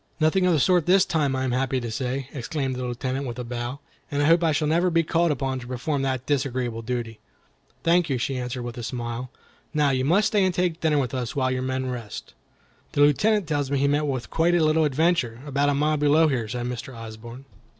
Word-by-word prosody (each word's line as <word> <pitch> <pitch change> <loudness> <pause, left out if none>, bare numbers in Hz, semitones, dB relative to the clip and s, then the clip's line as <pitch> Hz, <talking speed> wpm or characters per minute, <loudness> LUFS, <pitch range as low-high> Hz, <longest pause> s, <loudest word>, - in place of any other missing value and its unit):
"Nothing 175 +4 +3
of 180 - +4
the 155 - +2
sort 175 +3 +3
this 190 +1 +5
time, 145 -5 0
I 130 - -1
am 130 - -1
happy 130 +1 0
to 120 -2 -5
say," 130 +2 -3
exclaimed 135 0 -3
the 125 - -4
Lieutenant, 130 +2 -3
with 120 0 -5
a 125 - -4
bow, 120 +3 -5 0.3
"and 145 0 0
I - - +3
hope 165 +2 +4
I 165 - +3
shall 150 0 0
never 170 +4 +2
be 165 -1 +2
called 170 +2 +1
upon 135 -2 -1
to 120 - -10
perform 130 +3 -2
that 130 -2 -2
disagreeable 130 -5 -1
duty." 115 -1 -4 0.6
"Thank 170 0 +3
you," 135 - +1
she 130 +2 -2
answered, 125 0 -4
with 120 0 -6
a - - -4
smile. 120 +1 -4 0.5
"Now, 145 -2 +3
you 130 -1 0
must 195 +10 +3
stay 205 -3 +2
and 185 -2 +1
take 180 -2 0
dinner 155 -2 +2
with 130 -3 -1
us 125 -3 -3
while 130 -2 +1
your 130 0 -1
men 130 0 -2
rest." 120 -5 -6 0.6
"The 145 - +1
Lieutenant 205 +8 +4
tells 145 -3 -1
me 140 - +1
he 140 +1 +2
met 145 +1 +1
with 130 -3 -3
quite 170 +2 +2
a 170 - +3
little 155 +1 +3
adventure, 145 -5 +1
about 145 0 +1
a 145 - +1
mile 150 +2 +1
below 150 +2 +4
here," 125 -6 -1
said 120 +2 -4
Mr. 125 0 -6
Osborne. 115 +3 -9
135 Hz, 235 wpm, -25 LUFS, 125-155 Hz, 0.6 s, this